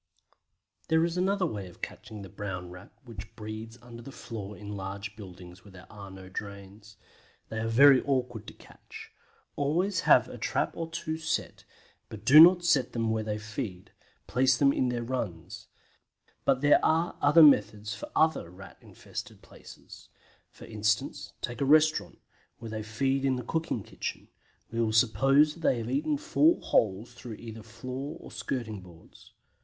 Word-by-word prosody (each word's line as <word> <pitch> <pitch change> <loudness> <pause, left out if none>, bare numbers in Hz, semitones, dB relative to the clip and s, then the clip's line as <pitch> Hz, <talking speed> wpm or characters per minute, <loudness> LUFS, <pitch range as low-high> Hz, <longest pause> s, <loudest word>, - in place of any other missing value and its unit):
There 160 +1 +3
is 170 0 -3
another 190 +1 +1
way 105 - -4
of 90 - -17
catching 105 -2 -8
the - - -9
Brown 90 -3 -6
Rat 90 +2 -12
which 110 -3 -10
breeds 110 +1 -8
under 120 -1 -11
the 135 - -10
floor 105 -6 -8
in 105 0 -7
large 100 +2 -6
buildings 90 -3 -12
where 100 - -15
there 95 - -14
are 100 -2 -10
no 95 -1 -11
drains. 100 +2 -9 0.5
They 110 - -4
are 115 - -2
very 135 +3 +6
awkward 125 -5 -2
to - - -9
catch. - - -14 0.4
Always 165 +7 0
have - - +6
a - - -10
trap - - -1
or 165 -1 -4
two 160 -1 -4
set, 160 - -3 0.4
but - - -10
do 150 +4 +8
not 175 +2 +8
set 145 -6 +2
them 115 -2 -1
where 110 0 0
they 105 -1 -3
feed; 105 -3 -6 0.3
place 130 +1 +2
them 140 0 +4
in 130 - 0
their 120 -1 -2
runs. 115 -10 -5 0.8
But 135 -1 +2
there 145 0 +5
are 165 +2 +1
other 150 +3 +7
methods 105 -6 +4
for 105 - -8
other 160 - +2
Rat 95 +2 -13
infested - - -9
places. - - -14 0.4
For - - -14
instance, 105 -1 -2
take 120 +3 -4
a - - +2
restaurant, 155 +2 +3 0.4
where 115 -2 -9
they 110 -1 -4
feed 135 +6 -1
in 135 -1 +2
the 125 - -5
cooking 160 -5 -2
kitchen; - - -6 0.4
we 115 0 -1
will 110 -1 0
suppose 135 +7 +4
they 155 -6 +1
have 115 +1 -4
eaten 150 - 0
four 320 +2 +3
holes 110 +3 0
through 120 -2 -9
either 115 0 -9
floor 130 +7 -7
or - - -12
skirting 110 -6 -4
boards. 85 -3 -17
115 Hz, 170 wpm, -28 LUFS, 105-140 Hz, 0.8 s, do